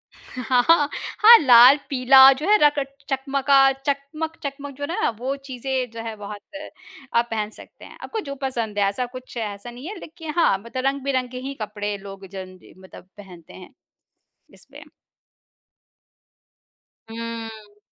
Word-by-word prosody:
हाँ, 255 +5 +1 0.5
लाल-पीला 265 0 +6
जो 280 +4 -6
है 425 - +6
रक्त 280 -2 0
चकमा 270 0 -2
का 275 - +7
चकमक-चकमक 280 +1 -5
जो 285 - -7
है 285 - -2
ना - - +2
वो 265 +3 -3
चीज़ें 260 0 -3
जो 230 0 -8
है 225 -1 -6
बहुत 205 0 -9 0.7
आप 235 0 +2
पहन 215 -1 -2
सकते - - -15
हैं। - - -14
आपको 450 - -5
जो 280 - -5
पसंद 230 -6 -3
है 200 - +3
ऐसा 225 +6 -3
कुछ 255 -1 -10
ऐसा 210 +1 -6
नहीं 250 +6 -10
है 420 - -6
लेकिन 320 -1 -9
हाँ 265 - +3
मतलब 235 +5 -6
रंग-बिरंगे 265 -2 -2
ही 270 +2 -6
कपड़े 205 -1 -4
लोग 195 0 -11
जन 185 -1 -9 0.2
मतलब 185 -1 -15
पहनते 180 -5 -14
हैं, 185 +7 -13 0.8
इसलिए। - - -15 2.3
हुँ। 225 -2 -8
250 Hz, 140 wpm, -22 LUFS, 215-275 Hz, 2.3 s, का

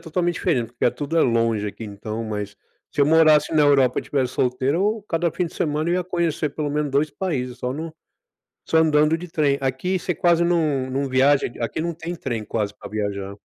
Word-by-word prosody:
totalmente 175 +1 -1
diferente, 120 -3 0
porque 125 - 0
é - - +4
tudo 150 +5 -2
é - - +5
longe 115 -3 +1
aqui, 110 +2 -7
então, 105 +2 -6
mas 105 -1 -5 0.3
se 145 - +1
eu - - +6
morasse 155 -1 +5
na 155 - +4
Europa 135 -3 +4
e - - -2
tivesse 130 -3 -1
solteiro, 130 +3 0
eu 210 +2 0
cada 170 -1 0
fim 180 - -1
de 165 - -7
semana 155 +2 -1
eu 175 - +2
ia 180 - 0
conhecer 170 -4 -1
pelo 145 0 -3
menos 150 0 -1
2 145 +2 +1
países, 125 -10 -3
só 125 0 -3
num 160 +3 -6 0.7
só 160 - +2
andando 155 0 +4
de 180 +2 -8
trem. 150 -4 +1
Aqui 135 +8 -1
você 180 0 -2
quase 170 0 +3
não 155 -7 +1
não 135 +1 -2
viaja, 135 +2 +3
aqui 120 - -12
aqui 120 +6 -2
não 170 0 -2
tem 165 +2 -6
trem 120 -9 -4
quase 105 -2 -2
para - - -11
viajar 100 -2 -3
145 Hz, 225 wpm, -22 LUFS, 125-165 Hz, 0.7 s, eu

